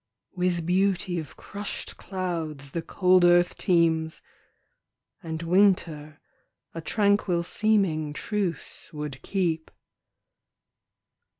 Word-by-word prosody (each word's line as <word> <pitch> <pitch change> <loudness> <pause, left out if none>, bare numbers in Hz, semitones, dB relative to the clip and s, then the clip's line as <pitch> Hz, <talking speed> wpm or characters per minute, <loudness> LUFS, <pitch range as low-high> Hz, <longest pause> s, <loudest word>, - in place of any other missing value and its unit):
With 180 -2 0
beauty 180 -1 +1
of 155 - -9
crushed 205 0 -6
clouds 165 -7 -4
the 170 - -2
cold 185 +1 +3
earth 175 0 +5
teems, 165 -3 +1 1.0
And 160 0 -5
winter 165 -5 +2 0.5
a 165 - -5
tranquil 200 -2 +1
seeming 180 -6 +1
truce 190 +2 -4
would 150 -3 -6
keep. 170 -5 -1
175 Hz, 90 wpm, -26 LUFS, 160-190 Hz, 1.0 s, earth